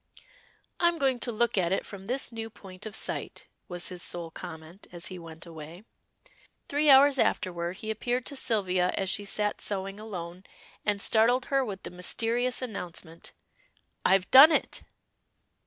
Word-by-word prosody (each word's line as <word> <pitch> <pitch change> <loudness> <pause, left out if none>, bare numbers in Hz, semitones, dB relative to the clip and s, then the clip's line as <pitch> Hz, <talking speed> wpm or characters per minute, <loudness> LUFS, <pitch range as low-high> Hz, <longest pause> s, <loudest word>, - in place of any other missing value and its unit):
"I'm 345 -1 +3
going 265 -4 +1
to 240 - -1
look 235 -2 +1
at 175 -1 0
it 195 - 0
from 195 -1 -9
this 255 +1 0
new 225 -1 -5
point 190 -2 -9
of 215 - -5
sight," - - -2 0.2
was 175 -3 -2
his 180 -1 -6
sole 170 -2 -1
comment 160 +2 -10
as 175 -1 -5
he 180 - -7
went 165 0 -10
away. 165 +2 -10 0.8
Three 295 +1 +2
hours 275 0 +7
afterward 175 -1 0
he 220 +1 -4
appeared 245 +3 -2
to 280 - -3
Sylvia 185 -8 +1
as 190 -1 0
she 205 - -1
sat 210 +1 -1
sewing 195 0 -3
alone, 180 -4 -7 0.4
and 205 -1 0
startled 235 +5 +3
her 270 -1 +4
with 200 -5 -6
the - - -7
mysterious 235 +8 -1
announcement. 175 -7 -6 0.7
"I've 190 -1 +3
done 280 +5 +10
it!" 300 - 0
200 Hz, 160 wpm, -28 LUFS, 180-240 Hz, 0.8 s, done